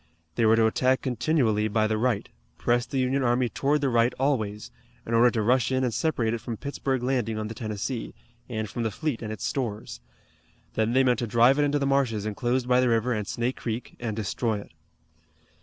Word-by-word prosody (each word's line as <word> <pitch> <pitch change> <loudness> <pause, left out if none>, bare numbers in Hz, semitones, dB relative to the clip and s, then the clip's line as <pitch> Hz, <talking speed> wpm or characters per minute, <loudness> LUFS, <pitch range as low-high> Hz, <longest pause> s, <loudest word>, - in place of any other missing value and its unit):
They 110 +6 +2
were 110 - +6
to 115 0 +4
attack 130 +4 +2
continually 125 -4 +1
by 110 +1 +1
the 110 0 0
right, 115 -3 0 0.3
press 120 0 +1
the 135 - -3
Union 130 +1 +1
army 120 0 +2
toward 145 +4 0
the 140 - +1
right 120 0 +3
always, 110 -7 -1 0.3
in 115 - -4
order 120 +2 +6
to 115 -3 -1
rush 125 +3 +2
in 130 0 +1
and 125 -3 0
separate 120 -8 0
it 115 - -3
from 115 -2 -5
Pittsburg 135 -1 -2
Landing 125 -4 0
on 110 0 -3
the - - -5
Tennessee, 110 +2 -4 0.3
and 110 -2 -3
from 120 - -5
the 115 - 0
fleet 140 +4 -3
and 110 -2 -5
its 95 -8 -5
stores. 105 - -3 0.7
Then 110 +1 0
they 135 +1 +4
meant 125 -3 +2
to 120 - -2
drive 120 +6 +4
it 145 - +4
into 145 0 +1
the 140 - 0
marshes 130 -7 +1
enclosed 120 +4 -1
by 125 0 +4
the 125 -1 +3
river 115 +2 +1
and 105 -3 -3
Snake 120 +5 -2
Creek 115 +1 -5
and 115 -3 -3
destroy 110 +1 -1
it. - - -15
120 Hz, 215 wpm, -26 LUFS, 110-130 Hz, 0.7 s, were